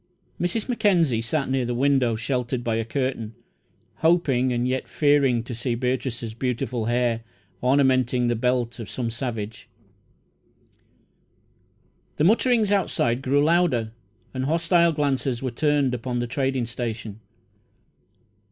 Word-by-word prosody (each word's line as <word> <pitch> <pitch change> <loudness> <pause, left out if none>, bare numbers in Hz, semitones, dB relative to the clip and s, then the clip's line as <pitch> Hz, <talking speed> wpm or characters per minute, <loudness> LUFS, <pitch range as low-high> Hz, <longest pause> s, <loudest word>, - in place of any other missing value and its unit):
Mrs. 180 +5 -1
Mackenzie 185 - +2
sat 135 +5 -1
near 130 -1 0
the 120 0 -2
window, 130 -3 +2
sheltered 125 +1 -2
by 115 - -1
a 115 - 0
curtain, 115 -2 -3 0.6
hoping 140 -7 +2
and 120 0 0
yet 130 +1 -2
fearing 140 -5 +2
to 120 - -7
see 120 +1 -2
Beatrice's 125 -2 -2
beautiful 125 -1 -2
hair 120 -1 +1 0.4
ornamenting 130 -2 +2
the 120 0 +1
belt 120 0 -1
of 115 - -7
some 120 -2 -3
savage. 115 -3 -5 2.5
The 150 - +1
mutterings 220 +2 +3
outside 130 -11 +1
grew 140 +2 +2
louder, 155 -9 +2 0.4
and 130 0 -2
hostile 170 +2 +3
glances 135 -4 -1
were 130 - -1
turned 145 0 +1
upon 125 +1 -3
the 120 - -1
trading 130 0 -1
station. 115 -2 -5
130 Hz, 125 wpm, -24 LUFS, 120-145 Hz, 2.5 s, mutterings